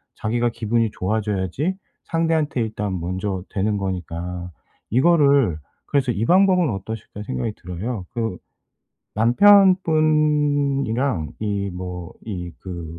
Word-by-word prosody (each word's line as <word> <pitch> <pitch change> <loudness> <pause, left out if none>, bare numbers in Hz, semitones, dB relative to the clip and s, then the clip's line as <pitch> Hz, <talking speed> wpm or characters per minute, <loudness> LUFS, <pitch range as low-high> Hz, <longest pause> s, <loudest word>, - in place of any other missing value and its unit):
자기가 120 +2 0
기분이 115 0 0
좋아져야지 105 - -1 0.3
상대한테 160 -5 0
일단 105 -3 -2
먼저 95 +2 -3
되는 105 +1 0
거니까. 90 -2 -4 0.4
이거를 140 - +4 0.3
그래서 130 -3 +1
'이 110 - -2
방법은 185 -1 +4
어떠실까.' 105 +1 -6
생각이 65 - -3
들어요. 95 +3 -5
그 110 -6 -3 0.8
남편분이랑 145 - +3
이 100 -2 -2
뭐 90 -1 -6
이 90 -5 -5
그 85 -3 -7
110 Hz, 250 characters per minute, -22 LUFS, 95-145 Hz, 0.8 s, 이거를